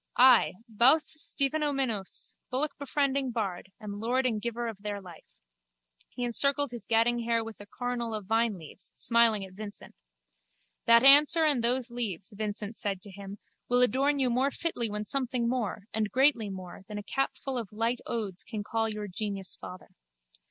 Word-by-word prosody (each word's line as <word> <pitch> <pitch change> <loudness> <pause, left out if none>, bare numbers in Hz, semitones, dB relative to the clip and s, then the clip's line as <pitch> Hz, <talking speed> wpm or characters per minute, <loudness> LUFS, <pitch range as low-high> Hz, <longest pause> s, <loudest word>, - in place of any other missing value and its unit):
I, 250 -5 +6
Bous 245 +8 +5 0.3
Stephanoumenos, 275 -8 -1 0.2
bullockbefriending 280 -1 -1
bard, 195 -4 -4
am 205 -1 -7
lord 250 +4 0
and 220 -4 0
giver 235 +1 -3
of 225 -3 -6
their 205 -1 -4
life. 180 -4 -13 0.8
He 245 - -6
encircled 280 +3 +3
his 235 -4 -9
gadding 230 +1 +3
hair 230 -1 0
with 225 -1 -9
a 205 - -11
coronal 240 0 -3
of 210 -2 -5
vineleaves, 210 -7 -2
smiling 230 -4 +3
at 190 - -14
Vincent. 205 +1 -8 0.9
That 235 +1 +7
answer 295 +4 +7
and 280 -6 +2
those 245 +1 +2
leaves, 215 -4 -4
Vincent 210 +1 -4
said 195 -2 -2
to 205 - -9
him, 200 +1 -9 0.3
will 245 0 +4
adorn 275 +5 +2
you 260 -3 +1
more 260 +3 +2
fitly 275 -7 -2
when 210 0 -4
something 250 -1 -1
more, 235 -5 -2
and 215 -1 0
greatly 255 -5 +2
more, 185 -2 -8
than 210 -1 -7
a 205 - -5
capful 270 +3 -3
of 225 -5 -7
light 230 +3 -1
odes 205 -6 -3
can 215 -2 -6
call 225 +1 -1
your 210 -1 -5
genius 195 0 -3
father. 180 0 -11
230 Hz, 165 wpm, -29 LUFS, 205-255 Hz, 0.9 s, That